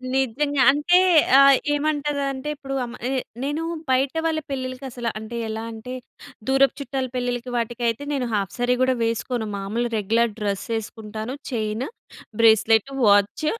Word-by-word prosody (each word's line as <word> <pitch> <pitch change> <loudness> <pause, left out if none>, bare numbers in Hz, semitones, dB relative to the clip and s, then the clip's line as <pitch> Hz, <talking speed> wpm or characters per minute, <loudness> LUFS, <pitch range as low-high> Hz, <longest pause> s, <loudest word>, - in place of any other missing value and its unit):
నిజంగా. 270 +2 +1
అంటే 295 +6 +3 0.4
ఆహ్, 275 -1 +7 0.2
ఏమంటదంటే 290 -2 -1
ఇప్పుడు 270 -2 -6
అమ్ 240 - -9
ఎ - - -2 0.3
నేను 295 +3 -2 0.3
బయట 265 +1 +2
వాళ్ళ 320 -1 +1
పెళ్ళిళ్ళకి 255 0 -4
అసలు 240 -1 -3
అంటే 220 +2 -7
ఎలా 220 +1 -4
అంటే 225 +3 -8 0.6
దూరపు 270 0 +4
చుట్టాల 265 0 -3
పెళ్ళిళ్ళకి 245 0 -2
వాటికైతే 235 +2 -1
నేను 270 -3 -1
హాఫ్ 200 -3 -1
శారీ 245 0 +2
కూడా 255 0 +2
వేసుకోను 230 0 -2
మామూలుగా 225 +5 -2
regular 225 +3 +1
dress 200 -2 -2
యేస్కుంటాను 220 +1 -6 0.2
chain, 220 +1 -2 0.6
bracelet, 225 +1 +5 0.2
watch, 205 +8 +3
245 Hz, 135 wpm, -23 LUFS, 220-275 Hz, 0.6 s, ఆహ్